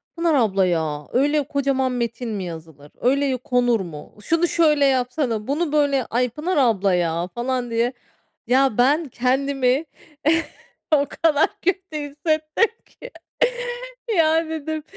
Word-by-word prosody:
"Pınar 335 -1 +1
Abla 200 -7 +2
ya, 155 -4 -1
öyle 290 +4 +2
kocaman 275 -2 0
metin 235 0 -3
mi 205 -3 -3
yazılır? 160 -4 -9
Öyle 270 +1 +2
konur 245 -2 +1
mu? 165 -4 -9
Şunu 330 +7 +2
şöyle 305 -4 +3
yapsana, 250 -4 0
bunu 300 +3 -1
böyle. 285 -4 +2
Ay, 250 +2 0
Pınar 305 +9 -3
Abla 210 -8 +3
ya." 170 0 0
falan 245 0 -2
diye. 235 +2 +1 0.5
Ya, 260 -1 +3
ben 290 +6 +3
kendimi 265 +3 +1 1.1
o 285 -1 +2
kadar 315 -1 +2
kötü 375 -3 -1
hissettim 310 +6 0 0.2
ki. - - -13 1.1
Ya, 320 0 +3
dedim, 315 -1 -4
265 Hz, 130 wpm, -22 LUFS, 230-300 Hz, 1.1 s, şöyle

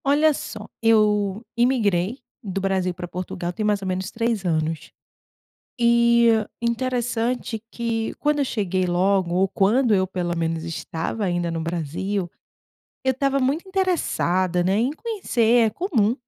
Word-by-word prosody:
Olha 300 +3 +4
só, 215 -5 -7
eu 210 -1 +2
imigrei 230 -4 +1 0.3
do 195 -2 -3
Brasil 190 -1 0
pra 175 0 -7
Portugal 175 0 -5
tem 215 - -3
mais 205 -1 +1
ou - - -3
menos 185 +1 -2
3 230 -3 -1
anos. 160 -1 -1 0.9
E 235 0 +5 0.3
interessante 235 -1 -1
que 230 -1 -2
quando 295 0 0
eu 280 - +2
cheguei 190 -6 -1
logo, 180 0 +1
ou 190 +1 +3
quando 225 +6 +3
eu 190 -1 +2
pelo 175 -2 -2
menos 165 -1 -1
estava 165 +5 -3
ainda 175 -2 -1
no 165 - -3
Brasil, 175 +3 -3 0.7
eu 260 - +2
estava 275 +1 0
muito 280 +8 0
interessada, 185 - +1
né, 190 +3 +1
em 235 +5 +2
conhecer. 245 - +2
É - - 0
comum, 235 - +1
210 Hz, 145 wpm, -23 LUFS, 180-240 Hz, 0.9 s, E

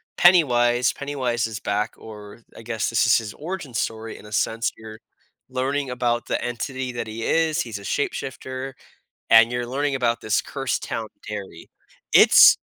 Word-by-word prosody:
Pennywise 125 -9 +4
Pennywise 130 -5 -2
is 110 -1 -6
back, 105 +1 -2
or 105 0 -11
I - - -10
guess 115 -2 -2
this 115 - +2
is - - +6
his 110 -3 -5
origin 160 -4 -6
story, 110 0 -3
in - - -13
a 105 - -14
sense, 110 +1 0
you're 110 0 -11 0.5
learning 135 +2 -1
about 120 -1 -1
the - - -1
entity 130 +2 -4
that 120 -2 -5
he 110 +1 -6
is, 160 +2 +1
he's 110 -4 -6
a - - -12
shapeshifter, 130 +2 -4 0.6
and 115 +1 +7
you're 120 0 -2
learning 140 +3 -1
about 120 -3 0
this 110 0 +1
cursed 135 -2 -3
town 115 -1 -4 0.2
Derry. 100 -5 -7 0.4
It's, - - +8
120 Hz, 165 wpm, -23 LUFS, 110-130 Hz, 0.6 s, It's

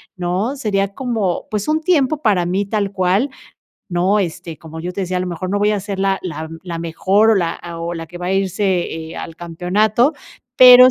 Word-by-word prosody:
¿no? 185 +8 -1
Sería 205 -7 0
como, 225 -9 -1
pues, 210 -2 -2
un 310 +1 +1
tiempo 310 -4 +2
para 190 -6 +2
mí 190 +3 0
tal 200 -1 -1
cual, 195 +7 +1 0.6
¿no?, 185 +3 +2
este, 170 -3 -3
como 160 0 -9
yo 175 +2 -4
te 195 - -3
decía, 185 0 -2
a - - -2
lo 185 - -2
mejor, 175 +1 -4
no 205 +2 0
voy 210 +1 +3
a 210 - +1
ser 200 -1 -4
la 195 0 +1
la 160 -4 -5
m 165 +1 -9
la 170 -2 -4
mejor 190 +6 +2
o - - +5
la, 170 -3 +1
ah, 170 -1 -7
o 170 +1 -3
la 165 -1 -6
que 175 +2 -10
va 180 - -4
a 185 - 0
irse, 195 +1 0 0.4
eh, 160 - -9
al 165 - -7
campeonato, 195 - +1 0.4
pero 250 0 +10
190 Hz, 225 wpm, -19 LUFS, 175-215 Hz, 0.6 s, pero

